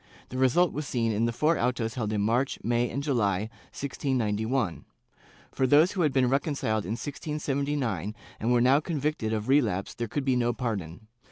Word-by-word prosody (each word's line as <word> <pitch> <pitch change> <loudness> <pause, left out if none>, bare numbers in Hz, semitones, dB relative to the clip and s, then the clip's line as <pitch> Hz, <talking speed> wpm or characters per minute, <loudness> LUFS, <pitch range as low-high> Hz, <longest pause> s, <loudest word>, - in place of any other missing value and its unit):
The 130 - -5
result 140 +7 +3
was 150 -1 -4
seen 115 -2 0
in 110 +2 +1
the 120 - +1
four 150 +8 +1
autos 120 -2 0
held 110 -4 -2
in 105 -1 0
March, 120 +6 +1
May 120 +1 +1
and 140 +4 -3
July, 110 -7 0 0.3
1691. 120 - -1 0.7
For 130 - +1
those 150 +7 +5
who 195 - -2
had 155 -3 +3
been 130 -2 +3
reconciled 135 - 0
in 100 - -2
1679 140 - -2 0.2
and 115 +3 0
were 120 -1 +4
now 130 +4 +5
convicted 150 -7 -2
of 110 -1 -2
relapse 115 -9 +2
there 120 0 -4
could 140 +5 -3
be 130 -2 +2
no 120 -1 +1
pardon. 105 -8 -4
125 Hz, 180 wpm, -28 LUFS, 110-140 Hz, 0.7 s, those